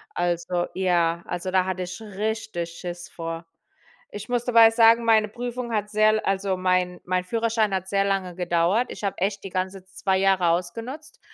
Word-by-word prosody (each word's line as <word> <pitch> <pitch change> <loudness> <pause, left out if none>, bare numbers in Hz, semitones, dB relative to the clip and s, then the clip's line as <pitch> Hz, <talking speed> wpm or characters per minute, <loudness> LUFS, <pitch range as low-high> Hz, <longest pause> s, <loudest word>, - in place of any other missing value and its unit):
Also 175 0 -1
ja, 175 -2 +1
also 180 +1 -4
da 185 -1 +3
hatte 185 -1 -2
ich 180 +2 -7
richtig 215 -3 -3
Schiss 175 +1 -7
vor. 165 0 -6 0.7
Ich 205 +2 -8
muss 245 -1 0
dabei 230 -2 +7
sagen, 230 0 +5
meine 220 -2 +4
Prüfung 240 +1 -5
hat 210 -1 -1
sehr 215 0 +4
l 215 0 +1
also 195 -1 -1
mein 185 -1 0
mein 180 0 0
Führerschein 225 0 0
hat 190 0 -3
sehr 195 0 +1
lange 195 -3 -1
gedauert. 175 +6 +1
Ich - - -8
habe 200 - -2
echt 195 +2 -1
die 195 - -6
ganze 185 +1 -3
2 190 0 -1
Jahre 190 -2 +3
ausgenutzt, 230 - -3
190 Hz, 180 wpm, -24 LUFS, 180-220 Hz, 0.7 s, dabei